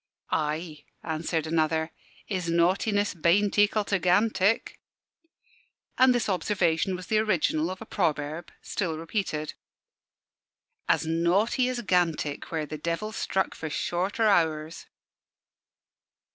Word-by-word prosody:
"Ay," 155 0 -2 0.2
answered 160 0 -2
another, 160 0 0 0.3
"His 185 -4 -3
Naughtiness 195 +5 +2
bain't 180 +4 +2
ekal 205 0 +3
to 200 -1 0
Gantick." 195 +4 +2 1.2
And 255 -1 +5
this 245 - 0
observation 185 -2 +1
was 180 0 -7
the 215 +4 +2
original 175 -6 +1
of 185 +2 -7
a - - -14
proverb, 155 -4 -2
still 165 -6 -2
repeated 165 -3 -3 1.4
"As - - +2
naughty 180 +10 +2
as 245 -1 -3
Gantick, 165 -6 0
where 160 -2 -1
the 155 0 -7
Devil 170 +7 -2
struck 190 -3 -1
for 160 - -6
shorter 185 - -1
hours." 160 -5 +1
175 Hz, 115 wpm, -27 LUFS, 160-205 Hz, 1.4 s, And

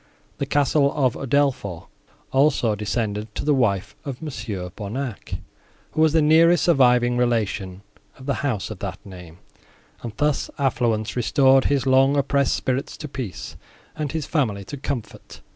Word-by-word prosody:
The - - -2
castle 145 0 +2
of 130 -5 +2
Udolpho, 135 -10 0 0.5
also, 135 -5 +3
descended 105 0 -3
to - - -4
the 150 - +3
wife 105 -8 0
of 135 -3 -6
Mons. 150 -9 -6 0.3
Bonnac, 110 +3 -5 0.6
who 155 - -1
was 160 -1 +5
the 160 -2 +4
nearest 165 +2 +5
surviving 125 -6 +4
relation 105 -6 -1 0.3
of 130 - -12
the 140 - 0
house 120 -8 -2
of 105 - -7
that 95 -3 -5
name, 90 -4 -11 0.6
and 120 - -5
thus 150 -1 0
affluence 120 -6 0
restored 130 +2 +4
his 140 -2 +1
long 135 +2 +4
oppressed 140 -1 +2
spirits 130 +1 -2
to 150 - -6
peace, 130 -9 -6 0.4
and 150 -3 -3
his 160 -2 -3
family 110 -11 -1
to 120 +9 -8
comfort. 130 -6 -6
130 Hz, 150 wpm, -23 LUFS, 110-140 Hz, 0.6 s, was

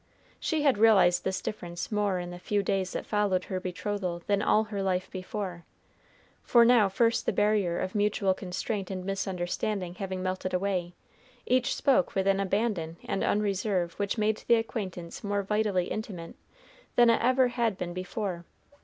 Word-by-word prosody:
She 310 -2 0
had 270 -8 +3
realized 190 -5 +5
this 190 0 -2
difference 175 -3 -5
more 205 -3 +1
in 175 0 -5
the 175 - -8
few 205 +2 0
days 190 -1 -1
that - - -4
followed 205 -3 +1
her 185 - -3
betrothal 185 -1 -3
than 200 -1 +1
all 215 0 +3
her 205 -2 -4
life 185 -1 -1
before, 185 -2 -5 0.8
for 235 -1 +5
now 230 -4 +5
first 230 +4 +1
the - - +4
barrier 205 -5 +2
of 185 - -3
mutual 205 -2 +2
constraint 190 +2 -4
and 185 -2 -5
misunderstanding 190 0 -2
having 190 -1 -4
melted 185 0 -2
away, 180 -2 -1 0.5
each 255 +1 +2
spoke 275 -1 +2
with 190 -1 +1
an 195 0 +3
abandon 195 -4 -1
and 195 - -1
unreserve 195 -4 0
which 200 +3 -1
made 215 0 +1
the 235 - +6
acquaintance 190 -7 -4
more 205 -1 -1
vitally 205 -3 +1
intimate 190 -6 -5 0.6
than 240 -1 +6
ever 255 +3 +3
it - - 0
had 230 -5 0
been 175 -1 -4
before. 185 -1 -4
195 Hz, 165 wpm, -28 LUFS, 185-215 Hz, 0.8 s, the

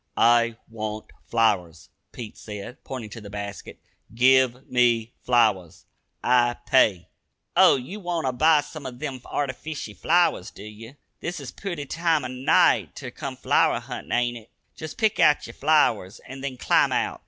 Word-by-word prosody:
"I 115 0 +4
want 110 -1 -6 0.2
flowers," 90 -8 0 0.2
Pete 115 -3 -9
said, 105 +3 -9
pointing 120 -5 -7
to 115 - -9
the 105 - -10
basket. 100 0 -7 0.4
"Give 130 +1 +3
me 120 -2 +2
flowers 110 -9 +1 0.4
I 120 -1 +3
pay." 100 -9 +3 0.5
"Oh, - - +7
ye 135 +10 -6
wanter 175 -8 -2
buy 155 +4 +4
sum 145 -2 -9
of 125 -1 -8
them 135 -1 -5
artyficial 135 -3 -5
flowers, 170 - +2
do 100 - -13
ye? 110 +4 -11 0.2
This 170 -1 -5
is 135 -3 -8
a - - -27
pooty 175 -8 -5
time 165 -2 0
o' - - -4
night 130 +1 +2
ter - - -7
come - - -6
flower - - +2
huntin,' - - -8
ain't 120 0 0
it? 110 -1 -15 0.2
Jest 160 -2 -8
pick 220 -2 +1
out 150 -1 +4
yer 115 - -10
flowers, 120 -11 +2
an' 130 +1 -9
then 135 -2 -5
climb - - +2
out!" - - -1
125 Hz, 165 wpm, -24 LUFS, 110-145 Hz, 0.5 s, Oh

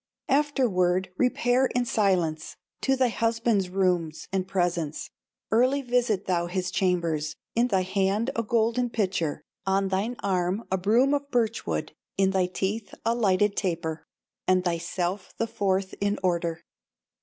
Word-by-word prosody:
Afterward 195 -11 +2
repair 250 +2 +2
in 245 0 +2
silence 180 -9 0 0.3
To 270 - +2
thy 260 -2 +2
husband's 230 -4 +1
rooms 180 -4 0
and 190 -1 0
presence, 175 -5 -1 0.4
Early 255 +5 +3
visit 240 -5 +1
thou 175 -2 0
his 185 0 -2
chambers, 170 -5 0 0.2
In 235 +2 +3
thy 190 -5 +1
hand 195 +6 0
a 230 - +1
golden 230 +2 +1
pitcher, 185 -9 -1 0.2
On 195 0 +2
thine 200 +6 -1
arm 185 +2 0
a 190 - +2
broom 235 +9 +3
of 285 0 -1
birch 235 -4 0
wood, - - -2 0.3
In 195 0 +3
thy 190 -2 +2
teeth 200 +4 -3
a 230 - +3
lighted 205 -3 +2
taper, 165 -4 -2 0.4
And 185 -1 +3
thyself 175 +2 -2
the 230 - +1
fourth 195 -4 -1
in 200 +1 +1
order. 170 -2 0
195 Hz, 145 wpm, -26 LUFS, 180-230 Hz, 0.4 s, Early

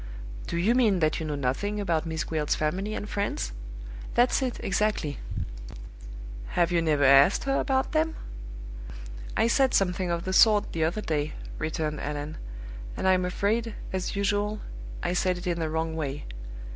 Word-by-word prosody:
"Do 170 - -2
you 195 +7 +3
mean 230 -6 +4
that 155 -2 +1
you 160 - -3
know 150 - -2
nothing 145 +11 -1
about 170 -5 0
Miss 160 -1 -2
Gwilt's 155 -2 0
family 190 +8 -1
and 205 - -4
friends?" 200 - -2 0.6
"That's 245 +3 +4
it, 255 -2 -2
exactly." 195 -7 0 1.4
"Have 170 0 +3
you 170 -1 +3
never 150 -3 +2
asked 140 +6 +6
her 275 0 +1
about 265 -1 +1
them?" 320 +1 +1 1.2
"I - - +4
said 260 +3 +3
something 180 -1 +1
of 170 0 -1
the 190 - -1
sort 210 +1 +5
the 160 -1 +1
other 175 +7 -1
day," 155 -4 -1 0.3
returned 155 -1 -2
Allan: 150 +1 -4 0.6
"and - - 0
I'm 185 -1 +4
afraid, 215 +5 0 0.2
as 190 +1 -2
usual, 205 +1 0 0.4
I - - 0
said 180 0 +1
it 175 - -8
in 175 -1 0
the 160 -1 -1
wrong 160 0 -1
way. 145 -2 -3
180 Hz, 165 wpm, -27 LUFS, 155-210 Hz, 1.4 s, asked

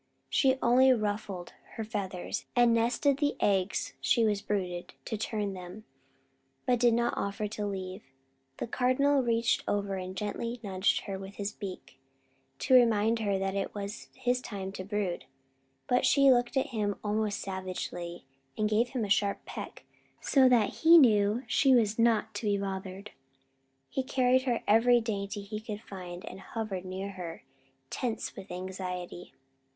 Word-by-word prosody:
She 265 -1 +3
only 255 +2 +6
ruffled 205 -5 -2 0.2
her 225 - -3
feathers, 200 -5 -4
and 240 -1 +5
nestled 240 +4 +2
the 290 -1 +1
eggs 195 -1 +1
she 235 -2 +3
was 205 -2 +1
brooding 180 -4 -2 0.2
to 225 - -3
turn 210 -2 -2
them, 185 +3 -9 0.8
but 250 -3 +2
did 235 -1 +4
not 235 0 +1
offer 200 +1 -2
to 210 -1 -3
leave. 190 0 -5 0.6
The - - -3
Cardinal 260 +4 +2
reached 230 -1 +1
over 200 -1 -1
and 185 0 -6
gently 230 +4 -3
nudged 190 -1 +1
her 195 -2 -5
with 195 +1 -9
his 205 +1 -3
beak, 195 -3 -8 0.6
to 260 - +1
remind 230 -2 +5
her 200 -3 0
that 195 0 -1
it 195 +1 -3
was 200 +1 -6
his 250 0 0
time 195 -5 -5
to 190 - -6
brood; 200 -3 -2 0.6
but 250 - +2
she 275 -1 +6
looked 245 +2 +2
at 265 - +1
him 210 -4 -1
almost 210 0 -1
savagely, 185 -3 -5 0.3
and 215 - +1
gave 220 +3 +2
him 240 -4 -2
a - - -4
sharp 200 0 +1
peck; - - -8 0.4
so 265 -2 +4 0.2
he 330 +10 +6
knew 215 -4 +4
she 260 +3 +4
was 220 -2 +2
not 225 -1 +2
to 205 +2 -3
be 205 -1 +2
bothered. 195 0 -5 0.8
He 265 - -2
carried 260 0 +2
her 240 -3 0
every 240 +3 +5
dainty 205 -2 -3
he 210 +1 -5
could 215 -1 -7
find 180 -2 -8
and 185 - -8
hovered 195 -3 -5
near 190 +2 -5
her, 175 -4 -7 0.5
tense 230 -3 -3
with 190 - -10
anxiety. 180 -1 -6
210 Hz, 160 wpm, -30 LUFS, 195-235 Hz, 0.8 s, only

